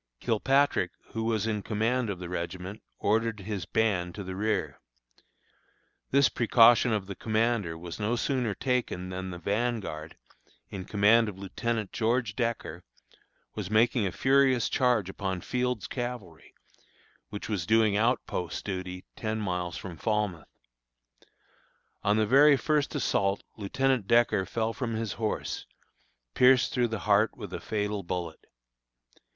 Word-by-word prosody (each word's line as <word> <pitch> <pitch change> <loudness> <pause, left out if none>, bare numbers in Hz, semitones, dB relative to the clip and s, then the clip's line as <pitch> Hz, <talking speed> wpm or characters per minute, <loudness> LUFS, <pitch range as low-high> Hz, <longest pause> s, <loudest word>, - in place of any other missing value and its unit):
Kilpatrick, 130 -3 +2 0.2
who 115 - -2
was 110 -2 0
in 105 -2 -1
command 115 +3 0
of 100 - -3
the 90 0 -7
regiment, 90 +3 -5 0.2
ordered 110 -1 0
his 95 -4 -4
band 95 -6 0
to 100 - -5
the 95 0 -6
rear. 105 +2 -1 1.3
This 140 -1 +5
precaution 120 +1 +5
of 105 -3 0
the 100 - -6
commander 110 -6 0
was 85 +3 -8
no 110 +3 0
sooner 120 -4 -1
taken 125 -8 -1
than 95 0 -5
the 90 - -6
vanguard, 100 -5 -2 0.5
in 95 -2 -6
command 110 +2 +4
of 95 - -9
Lieutenant 110 +2 -3
George 115 -2 0
Decker, 120 -2 -3 0.7
was 105 -4 -5
making 110 0 +3
a - - -3
furious 130 0 +3
charge 120 -7 +2
upon 95 -1 -3
Field's 125 +2 -2
Cavalry, 120 - -6 0.7
which 105 - -6
was 100 -7 -2
doing 110 -2 +4
outpost 105 -6 -1
duty 90 -2 -5
ten 110 0 -3
miles 90 -4 -2
from 90 -4 -8
Falmouth. 105 -6 -1 1.5
On 105 +1 +2
the 110 - +3
very 140 +5 +6
first 150 +3 0
assault 100 -8 0
Lieutenant 125 +2 0
Decker 115 -5 +3
fell 115 0 -1
from 115 -3 -3
his 110 -2 -2
horse, 110 - -2 0.7
pierced 125 0 +5
through 120 -2 +2
the 110 -3 -4
heart 105 +1 +3
with - - -8
a - - -3
fatal 105 -1 -2
bullet. 85 -3 -5
110 Hz, 140 wpm, -28 LUFS, 95-120 Hz, 1.5 s, very